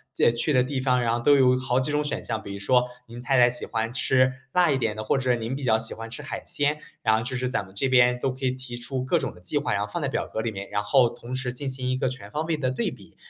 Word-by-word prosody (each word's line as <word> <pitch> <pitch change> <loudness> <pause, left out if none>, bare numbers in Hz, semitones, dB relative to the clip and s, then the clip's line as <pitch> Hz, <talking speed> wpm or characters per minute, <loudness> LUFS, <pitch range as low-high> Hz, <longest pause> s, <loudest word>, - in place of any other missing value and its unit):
这 - - +4
去 120 +6 -1
的 130 -3 +4
地 130 0 -2
方， 125 -2 +2
然 115 - +1
后 120 - 0
都 145 - +6
有 125 -2 +5
好 130 0 +1
几 130 +3 -1
种 150 0 +1
选 145 - -3
项， 110 -2 -2
比 100 - -8
如 100 - -5
说 125 +4 +3 0.2
您 120 +1 -9
太 130 +1 +2
太 120 0 +7
喜 120 0 -4
欢 115 +2 -2
吃 130 0 +3 0.2
辣 175 -1 +4
一 135 - +2
点 110 -3 0
的， 110 - -4
或 120 - +1
者 125 -2 +2
您 115 +3 -3
比 140 - -6
较 110 -3 +4
喜 115 0 -6
欢 115 0 -8
吃 115 - -7
海 - - -5
鲜， 145 +1 0 0.2
然 110 - +4
后 110 - 0
就 125 +1 -3
是 125 0 -1
咱 115 -5 -1
们 95 0 -16
这 135 +7 0
边 125 -1 +4
都 135 +1 0
可 130 +1 -10
以 - - +2
提 130 -1 -7
出 130 +2 -4
各 170 +6 +2
种 135 -9 -4
的 - - -15
计 90 0 -1
划， - - -2
然 - - 0
后 - - -10
放 - - -2
在 - - 0
表 - - -1
格 110 - -3
里 115 - -1
面， 100 -1 -6
然 105 0 0
后 120 +4 +4
同 120 +1 -7
时 125 -2 -2
进 135 +2 -4
行 130 -1 -3
一 - - +1
个 130 0 0
全 130 +1 -8
方 150 +1 -1
位 160 - 0
的 130 -4 0
对 130 - -1
比。 - - -13
125 Hz, 350 characters per minute, -25 LUFS, 115-130 Hz, 0.2 s, 太